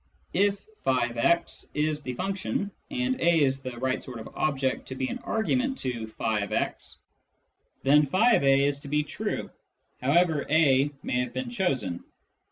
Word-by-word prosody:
If 200 0 +1
" - - -34
</>x 130 +6 +1
" - - -35
is 150 0 0
the 125 -3 -5
function, 195 +3 -2 0.2
and 260 -2 -1
a 170 -2 +4
is 135 -1 +1
the 130 -2 -7
right 130 +1 -1
sort 125 -2 -8
of 110 - -8
object 135 -3 -1
to 130 - -6
be 130 0 -1
an - - -4
argument 255 +4 0
to 120 -4 -3
" 110 - -19
<j>x" 105 -3 -1 0.9
then 145 +2 +5
<j>a 140 - +4
is 140 0 0
to 140 - -11
be 150 +1 +1
true, - - -4 0.5
however 155 +3 +3
a 145 -3 +4
may 125 - 0
have 125 - -2
been 255 -2 -4
chosen. 135 - -1
145 Hz, 165 wpm, -27 LUFS, 130-185 Hz, 0.9 s, then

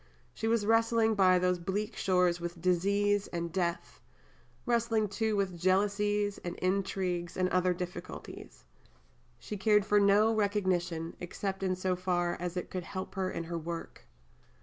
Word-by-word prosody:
She 225 - -3
was 225 -2 +2
wrestling 225 0 +3
by 185 -3 +5
those 180 0 +1
bleak 205 +5 -3
shores 180 -2 +2
with 170 0 -5
disease 200 +3 +2
and 170 -1 -4
death, 175 -1 -2 0.6
wrestling, 230 -2 +1
too, 220 +1 0
with 190 -4 -1
jealousies 205 +2 +1
and 175 0 -4
intrigues 185 -2 -1
and 185 0 +2
other 185 0 +2
difficulties. 180 - -7 0.7
She 210 - -6
cared 210 0 +3
for 210 -1 +4
no 205 +2 +4
recognition, 185 -6 0
except 195 +2 -4
in 185 -1 0
so 185 0 -1
far 175 -1 0
as 180 0 -4
it 180 - -4
could 185 -1 -3
help 185 +2 -6
her 190 -1 -1
in 170 - -4
her 170 0 -4
work. 165 +1 -7
185 Hz, 150 wpm, -31 LUFS, 175-205 Hz, 0.7 s, by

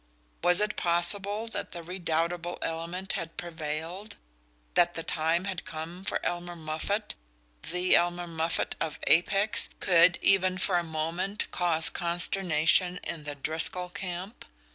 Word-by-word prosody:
Was 180 +1 +4
it 210 0 -1
possible 195 +5 +3
that - - -5
the 170 - -7
redoubtable 175 0 -2
element 170 +4 -4
had 165 0 -5
prevailed? 165 +4 -5 0.6
That 175 0 +3
the 165 - -3
time 165 +3 0
had 190 -2 -4
come 165 +4 -8
when - - -1
Elmer 175 0 -3
Moffatt 160 +6 -3 0.6
the 180 +1 +3
Elmer 175 0 +1
Moffatt 165 -1 -2
of 160 -2 -2
Apex! 195 +5 +3
could, 175 -1 +4
even 185 -1 +3
for 185 -1 +1
a - - -3
moment, 170 +6 -3
cause 165 -2 +4
consternation 175 0 +2
in 155 -3 -6
the 145 0 -5
Driscoll 160 +5 +2
camp? 185 +2 -7
175 Hz, 135 wpm, -28 LUFS, 165-185 Hz, 0.6 s, Was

